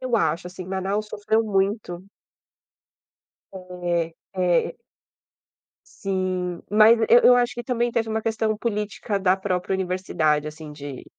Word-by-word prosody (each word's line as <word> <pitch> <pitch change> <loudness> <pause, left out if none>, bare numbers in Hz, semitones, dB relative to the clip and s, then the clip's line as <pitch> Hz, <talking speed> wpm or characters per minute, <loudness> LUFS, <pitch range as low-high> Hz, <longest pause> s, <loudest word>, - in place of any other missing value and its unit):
Eu 255 -2 0
acho, 170 -4 0
assim, 180 0 -8
Manaus 195 +3 -2
sofreu 220 +2 0
muito. 195 -3 -1 1.5
É, 175 -3 -3 0.2
é. 180 - +1 1.2
Sim, 185 -2 -2
mas 215 +2 +6
eu 240 - +8
eu 245 - +8
acho 245 -1 +1
que 240 - -5
também 240 -1 -1
teve 225 -1 0
uma 220 0 -2
questão 220 -1 0
política 210 -3 -2
da 190 0 +3
própria 185 0 -2
universidade 175 -5 0
assim 155 0 -10
de, 145 -3 -8
190 Hz, 130 wpm, -24 LUFS, 180-220 Hz, 1.5 s, eu